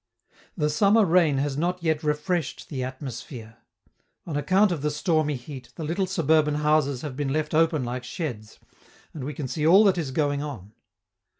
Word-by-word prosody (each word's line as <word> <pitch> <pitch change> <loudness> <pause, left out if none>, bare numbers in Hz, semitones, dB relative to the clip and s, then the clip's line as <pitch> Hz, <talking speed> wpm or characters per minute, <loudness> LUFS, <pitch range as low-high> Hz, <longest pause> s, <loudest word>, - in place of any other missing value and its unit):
The 150 -2 +1
summer 205 +6 +4
rain 165 -5 +3
has 140 0 -1
not 175 +1 -1
yet 160 -2 +1
refreshed 150 +1 -2
the 130 -4 -3
atmosphere. 130 -3 -7 0.7
On 160 - -5
account 185 +8 +3
of 165 -5 -2
the 150 - 0
stormy 150 -1 0
heat, 130 0 -9
the 165 - -6
little 175 +5 -1
suburban 155 -4 +2
houses 150 -3 +1
have 145 -4 -5
been 140 -1 -2
left 155 +2 -1
open 160 -3 +2
like 120 +1 -4
sheds, 120 -6 -6 0.6
and 150 - -6
we 145 +1 -5
can 140 -2 -4
see 150 +5 -1
all 190 +6 +7
that 190 -4 +3
is 155 -5 -3
going 145 +1 0
on. 115 -9 -7
150 Hz, 180 wpm, -25 LUFS, 135-165 Hz, 0.7 s, all